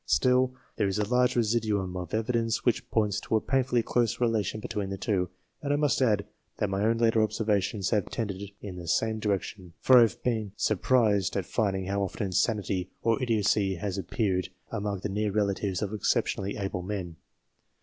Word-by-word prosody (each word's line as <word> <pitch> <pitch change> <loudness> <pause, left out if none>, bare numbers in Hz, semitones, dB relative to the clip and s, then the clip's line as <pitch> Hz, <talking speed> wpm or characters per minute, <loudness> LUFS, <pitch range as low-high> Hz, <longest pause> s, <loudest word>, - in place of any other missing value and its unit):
Still, 130 0 +3 0.2
there 105 - +2
is 95 - -1
a 105 -1 0
large 125 +1 +2
residuum 105 -5 0
of 90 -2 -5
evidence 115 +1 0
which 120 -3 +1
points 105 -2 +1
to - - -2
a - - +4
painfully 125 -1 +1
close 120 -1 0
relation 110 -4 0
between 105 -2 -3
the 95 - -4
two, 95 -3 0 0.3
and 145 - -2
I - - +3
must 145 -2 +1
add 105 -5 +2 0.3
that 105 -3 -1
my 95 +1 0
own 115 +1 +2
later 115 -1 +3
observations 105 -2 0
have 105 -4 +1
tended 100 -4 -3 0.2
in 95 -3 -6
the 85 -1 -8
same 110 +6 +1
direction, 100 -3 -3
for 130 -1 +7
I - - +8
have 115 -5 +1
been 110 -5 -1
surprised 110 -3 +2
at 95 - -1
finding 95 -4 -1
how 100 +1 -1
often 100 +2 -2
insanity 95 -1 0
or 115 +3 +2
idiocy 105 -4 +2
has 95 +2 -3
appeared 95 0 -1 0.2
among 100 -2 -3
the 105 - -2
near 105 +1 -1
relatives 100 -1 0
of 105 0 -3
excep 105 - +1
tionally 100 +1 -3
able 95 -2 -2
men. 90 -4 -5
105 Hz, 190 wpm, -28 LUFS, 95-115 Hz, 0.3 s, I